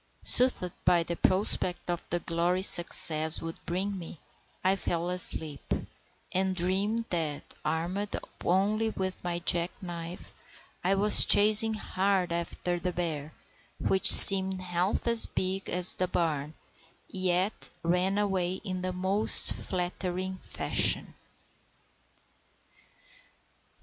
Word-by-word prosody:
Soothed 245 -8 +2
by 170 -1 0
the 170 +1 -7
prospect 185 -1 -2
of 175 - -6
the 175 - -4
glory 175 +3 -3
success 160 -3 +5
would 165 0 -11
bring 190 +3 -5
me, 170 -1 -12 0.5
I 190 +1 0
fell 175 -2 -5
asleep, 160 -5 -4 0.6
and 190 0 -3
dreamed 195 +6 -2
that, 155 -4 -6
armed 175 +6 -5 0.3
only 210 +5 -2
with 190 -3 -8
my 175 -1 -5
jack 170 0 -1
knife, 175 -2 -11 0.5
I 190 +2 -1
was 205 +2 +6
chasing 215 +2 +4
hard 190 -3 -4
after 170 +1 -6
the 180 +1 -5
bear, 160 -4 -7 0.5
which 190 0 0
seemed 190 -1 +11
half 180 +1 -4
as 235 -1 +3
big 190 +1 -6
as 180 0 +5
the 185 - -4
barn, 155 -4 -5 0.5
yet 185 +2 -4
ran 180 +3 -2
away 190 -3 -3
in 185 -1 -8
the 185 0 -6
most 190 +4 +3
flattering 185 +1 -6
fashion. - - -2
180 Hz, 115 wpm, -25 LUFS, 170-190 Hz, 0.6 s, seemed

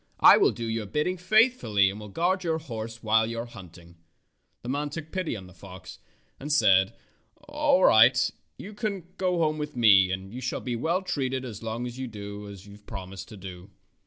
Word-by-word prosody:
I - - +9
will - - +4
do 115 - -5
your 115 -2 -3
bidding 150 - -1
faithfully 180 - +3
and 100 - -9
will 105 -1 -9
guard 180 - 0
your 165 -2 0
horse 115 -6 -7
while 110 0 +3
you 115 0 -5
are 115 - -3
hunting." 85 -6 -14 0.7
The 120 - -6
man 145 +2 -2
took 160 +1 -8
pity 185 -8 -2
on 95 -3 -8
the 90 - -15
fox 95 0 -12 0.4
and 145 +3 -5
said, 95 -10 +4 0.5
^'All 295 -1 +2
right, 115 +4 +5 0.3
you 210 - -9
can 205 -4 -3 0.2
go 180 -1 +1
home 155 -2 0
with 150 -2 -5
me, 100 -6 +6
and 95 +2 -5
you 125 - -6
shall 125 - -3
be 125 -2 -4
well 170 +10 -1
treated 130 -7 -2
as 110 -5 -8
long 115 +2 -4
as 125 +1 -7
you 130 - -4
do 105 -2 -8
as 100 -1 -11
you 100 - -14
have 105 0 -16
promised 95 -2 -8
to 105 - -11
do." 90 0 -10
115 Hz, 210 wpm, -26 LUFS, 100-160 Hz, 0.7 s, I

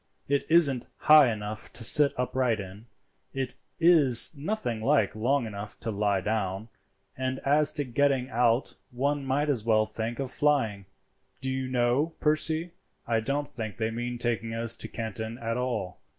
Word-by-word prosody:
It 140 0 0
isn't 145 -7 +3
high 150 -5 +6
enough 105 -1 -6
to 115 - -6
sit 145 +5 +6
upright 125 -2 0
in, 100 +4 -10 0.5
it 135 -1 -3 0.3
is 160 -6 +6
nothing 145 - -3
like 110 -2 +1
long 125 +4 0
enough 105 -1 -8
to 115 - -3
lie 100 -2 0
down, 105 0 -3 0.5
and 130 0 -3
as 145 +2 +4
to 145 - 0
getting 135 0 0
out 120 +1 +1 0.2
one 140 +3 -2
might 135 +3 -1
as 130 -7 -1
well 110 -1 +2
think 115 +2 -5
of 135 -2 -4
flying. 115 -10 0 0.5
Do 130 0 -4
you 130 0 -3
know, 130 +5 0
Percy, 155 +2 +1 0.3
I 115 -1 0
don't 140 +6 -2
think 110 -7 -7
they 110 0 -2
mean 120 +1 -4
taking 115 -1 -2
us 115 0 0
to - - -3
Canton 110 0 -5
at 115 -1 -3
all. 120 -7 -3
120 Hz, 165 wpm, -27 LUFS, 110-140 Hz, 0.5 s, high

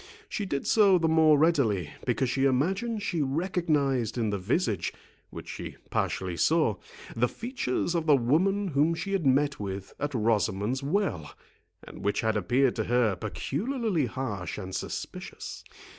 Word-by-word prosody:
She 205 - -3
did 140 -5 -2
so 200 -4 +5
the 165 -2 +1
more 160 -2 +5
readily, 125 - +2 0.2
because 125 +2 +1
she 135 +2 +1
imagined 195 - 0
she 170 -5 -1
recognised 140 - 0
in 110 -3 0
the 100 - -2
visage, 105 - 0 0.4
which - - -9
she - - -7 0.2
partially 95 -2 -1
saw, 155 - +2 0.4
the 120 +2 +2
features 225 - -2
of 165 -2 -1
the 150 - +7
woman 185 +11 +2
whom 155 +2 +2
she 195 +4 -4
had 175 -7 +1
met 140 +2 +2
with 95 -1 -5
at 145 -1 -2
Rosamond's 110 +2 +1
Well, 140 - -1 0.5
and - - -11
which 100 - +1
had 110 -1 +1
appeared 120 +6 +2
to 110 - 0
her 120 -4 +2
peculiarly 220 - -2
harsh 105 -8 -4
and 95 -2 -6
suspicious. - - -6
135 Hz, 155 wpm, -28 LUFS, 110-170 Hz, 0.5 s, the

